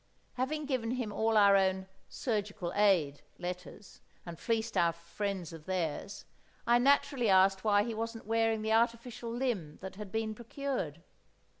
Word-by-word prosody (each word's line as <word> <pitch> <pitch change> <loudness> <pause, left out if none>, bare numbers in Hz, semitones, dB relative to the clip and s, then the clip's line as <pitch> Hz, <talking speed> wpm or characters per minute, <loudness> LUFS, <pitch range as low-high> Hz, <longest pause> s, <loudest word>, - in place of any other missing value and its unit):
Having 295 +4 -2
given 255 -5 -1
him 240 -4 -3
all 220 +1 +2
our 200 -1 +7
own 190 -1 +2 0.2
"Surgical 205 -7 -3
Aid" 180 -9 +3 0.2
letters, 180 +2 -7 0.2
and 170 -2 -8
fleeced 230 -1 -1
our 170 -1 +3
friends 175 +1 -4
of 160 -2 -10
theirs, 185 0 -3 0.4
I 240 +1 +5
naturally 270 -2 +3
asked 190 0 +4
why 205 -1 +4
he 235 - -3
wasn't 225 +1 -5
wearing 225 0 +1
the 220 0 +1
artificial 235 +1 0
limb 230 - -2
that 190 0 -8
had 210 -2 -7
been 220 -1 -1
procured? 230 - -4
210 Hz, 150 wpm, -32 LUFS, 185-230 Hz, 0.4 s, our